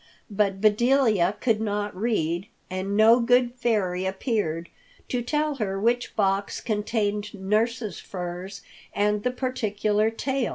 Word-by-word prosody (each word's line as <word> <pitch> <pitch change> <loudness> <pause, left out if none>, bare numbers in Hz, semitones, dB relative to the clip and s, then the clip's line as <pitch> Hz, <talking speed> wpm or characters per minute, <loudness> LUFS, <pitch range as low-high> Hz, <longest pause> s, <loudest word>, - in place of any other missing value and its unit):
But 200 -1 +1
Bedelia 215 -3 +3
could 225 -4 +1
not 205 -2 -2
read, 185 -4 -1 0.2
and 190 +2 -2
no 225 +3 +7
good 245 0 +3
fairy 210 -7 0
appeared 190 - -2 0.4
to 250 - -1
tell 295 +3 -1
her 195 -4 -2
which 240 +3 0
box 195 -1 0
contained 210 -1 -2
nurse's 215 +1 -1
furs 180 +1 -6 0.3
and 210 0 +1
the 250 - 0
particular 215 -4 0
tail. 265 +2 -1
210 Hz, 125 wpm, -25 LUFS, 195-240 Hz, 0.4 s, no